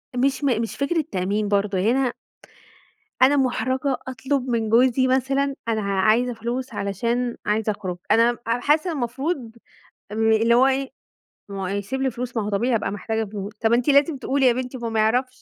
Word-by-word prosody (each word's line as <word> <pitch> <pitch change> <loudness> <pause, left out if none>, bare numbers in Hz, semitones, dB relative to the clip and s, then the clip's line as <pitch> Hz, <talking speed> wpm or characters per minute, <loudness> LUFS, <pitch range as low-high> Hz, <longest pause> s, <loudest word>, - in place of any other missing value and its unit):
مش 270 +3 0
م 245 -5 +2
مش 225 - -4
فكرة 305 +3 0
تأمين 200 +3 -1
برضو 200 -1 0
هنا 240 +6 +1 1.1
أنا 275 +3 +6
مُحرَجَة 260 +1 0
أطلب 260 +1 -2
من 225 -2 0
جوزي 255 +3 +4
مثلًا 270 +2 +1
أنا 220 -1 0
ع 200 -1 -1
عايزة 235 +5 +3
فلوس 235 +3 -4
علشان 235 +5 -2
عايزة 215 +1 +1
أخرج، 190 -4 -5
أنا 235 +1 +4
حاسة 295 +9 +1
إن - - -4
المفروض 255 -1 -3 0.6
امم، 220 +1 +2
اللي 225 +2 +3
هو 250 +2 +5
إيه، 270 0 -1 0.6
ما 195 -1 -5
هو - - -2
هيسيب 200 +7 -3
لي 265 -1 +1
فلوس 245 0 -5
ما 220 - 0
هو 205 - -3
طبيعي 235 +5 +1
هابقى 210 - -1
محتاجة 220 +2 -2
فلوس، 205 -1 -6
طب 225 +1 +1
أنتِ 240 +1 +1
لازم 285 +1 +4
تقولي 270 +1 0
يا 250 - +5
بنتي 255 +1 -4
ما 235 - -6
هو - - -1
ما 225 -1 -1
يعرفش 250 +4 0
240 Hz, 190 wpm, -23 LUFS, 215-265 Hz, 1.1 s, أنا